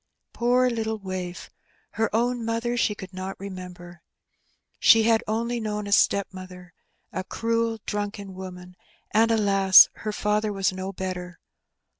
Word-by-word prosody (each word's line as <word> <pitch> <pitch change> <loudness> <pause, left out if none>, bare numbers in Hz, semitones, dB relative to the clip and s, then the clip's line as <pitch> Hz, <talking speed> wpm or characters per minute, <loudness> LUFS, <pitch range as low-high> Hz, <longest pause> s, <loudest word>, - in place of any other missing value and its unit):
Poor 250 +2 +2
little 220 -2 -2
waif! 185 -3 -6 0.4
Her 225 0 0
own 240 +2 0
mother 230 +1 -1
she 220 -3 +1
could 190 -2 -10
not 185 +1 -6
remember. 180 -3 -9 0.8
She 225 0 +6
had 225 0 +3
only 235 +2 -1
known 210 -1 -3
a 200 - -6
stepmother 185 -3 0 0.2
— - - -45
a 185 - -3
cruel, 230 +2 -1
drunken 205 -1 -4
woman; 180 -1 -9 0.4
and, 225 +1 +3
alas! 195 -3 +6
her 215 - -4
father 210 0 0
was 195 -1 0
no 190 +1 -5
better. 180 -1 -6
205 Hz, 140 wpm, -25 LUFS, 185-225 Hz, 0.8 s, She